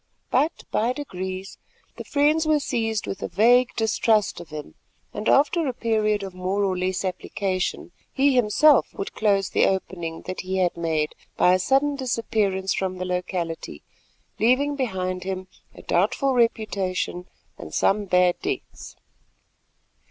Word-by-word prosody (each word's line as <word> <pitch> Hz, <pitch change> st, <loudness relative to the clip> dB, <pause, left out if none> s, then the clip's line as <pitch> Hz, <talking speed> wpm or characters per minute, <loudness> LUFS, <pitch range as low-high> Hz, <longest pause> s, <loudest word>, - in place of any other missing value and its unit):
But, 290 Hz, +6 st, +1 dB
by 235 Hz, +3 st, +1 dB
degrees, 190 Hz, -8 st, -6 dB, 0.4 s
the -, -, -6 dB
friends 300 Hz, +2 st, +2 dB
were 305 Hz, -1 st, +4 dB
seized 225 Hz, -6 st, -1 dB
with 195 Hz, -, -5 dB
a -, -, -2 dB
vague 245 Hz, +4 st, +4 dB
distrust 220 Hz, -1 st, +1 dB
of 170 Hz, -, -10 dB
him; 150 Hz, -1 st, -8 dB, 0.4 s
and, 210 Hz, -, -2 dB
after 300 Hz, +3 st, +3 dB
a 255 Hz, -, -2 dB
period 215 Hz, -3 st, 0 dB
of 190 Hz, -1 st, -6 dB
more 185 Hz, +2 st, -1 dB
or 190 Hz, -2 st, +1 dB
less 185 Hz, +1 st, -1 dB
application, 185 Hz, 0 st, -3 dB, 0.2 s
he 275 Hz, +1 st, +3 dB
himself 255 Hz, +4 st, +5 dB
would 195 Hz, -, -5 dB
close 200 Hz, -3 st, +1 dB
the -, -, +3 dB
opening 175 Hz, -4 st, -3 dB
that 185 Hz, -, -5 dB
he 185 Hz, +1 st, -3 dB
had 180 Hz, -2 st, +1 dB
made 160 Hz, -2 st, -1 dB, 0.2 s
by 180 Hz, -, +5 dB
a 185 Hz, -, +3 dB
sudden 275 Hz, +8 st, +2 dB
disappearance 215 Hz, -7 st, -1 dB
from 185 Hz, -1 st, -2 dB
the 185 Hz, -, -4 dB
locality, 180 Hz, -2 st, -4 dB, 0.6 s
leaving 270 Hz, +6 st, +3 dB
behind 185 Hz, -8 st, -2 dB
him 185 Hz, 0 st, -4 dB, 0.3 s
a -, -, -12 dB
doubtful 275 Hz, -1 st, +1 dB
reputation 200 Hz, -6 st, 0 dB, 0.3 s
and 80 Hz, -, -8 dB
some 205 Hz, -, +1 dB
bad 180 Hz, -1 st, +3 dB
debts. -, -, -5 dB
200 Hz, 145 wpm, -24 LUFS, 185-245 Hz, 0.6 s, himself